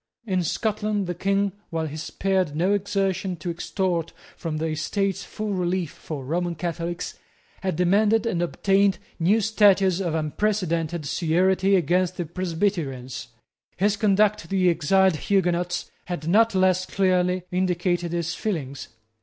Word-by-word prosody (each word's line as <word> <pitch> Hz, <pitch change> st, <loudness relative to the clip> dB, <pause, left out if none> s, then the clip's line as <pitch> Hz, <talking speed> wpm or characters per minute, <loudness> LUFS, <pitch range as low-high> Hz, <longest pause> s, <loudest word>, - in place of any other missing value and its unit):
In 185 Hz, -4 st, 0 dB
Scotland 210 Hz, +3 st, -1 dB
the 175 Hz, -, -2 dB
King, 195 Hz, +3 st, 0 dB, 0.2 s
while 165 Hz, -1 st, -2 dB
he 150 Hz, -1 st, -6 dB
spared 180 Hz, 0 st, -1 dB
no 180 Hz, +6 st, +2 dB
exertion 195 Hz, -2 st, -1 dB
to 170 Hz, +1 st, -4 dB
extort 170 Hz, -1 st, -2 dB, 0.2 s
from 160 Hz, -3 st, -4 dB
the 160 Hz, -, -2 dB
Estates 190 Hz, +5 st, -1 dB
full 215 Hz, -1 st, -4 dB
relief 180 Hz, -3 st, -1 dB
for 145 Hz, -5 st, -7 dB
Roman 170 Hz, +4 st, -1 dB
Catholics, 170 Hz, +1 st, -4 dB, 0.4 s
had 190 Hz, -4 st, -1 dB
demanded 205 Hz, +6 st, +3 dB
and 180 Hz, -7 st, 0 dB
obtained 195 Hz, +2 st, +2 dB, 0.2 s
new 190 Hz, +7 st, +3 dB
statutes 195 Hz, -3 st, +4 dB
of 170 Hz, -4 st, -1 dB
unprecedented 170 Hz, -1 st, -1 dB
severity 185 Hz, +5 st, +2 dB
against 180 Hz, 0 st, +1 dB
the 175 Hz, -, -2 dB
Presbyterians. 160 Hz, -, -2 dB, 0.5 s
His 205 Hz, +3 st, +2 dB
conduct 210 Hz, 0 st, +3 dB
to -, -, -10 dB
the 185 Hz, -1 st, +3 dB
exiled 180 Hz, +2 st, +3 dB
Huguenots 175 Hz, -1 st, 0 dB
had 170 Hz, -3 st, -5 dB
not 220 Hz, +4 st, +4 dB
less 185 Hz, 0 st, +3 dB
clearly 185 Hz, -1 st, +1 dB
indicated 175 Hz, -1 st, 0 dB
his 170 Hz, 0 st, -1 dB
feelings. 155 Hz, -9 st, -4 dB
180 Hz, 135 wpm, -24 LUFS, 170-195 Hz, 0.5 s, statutes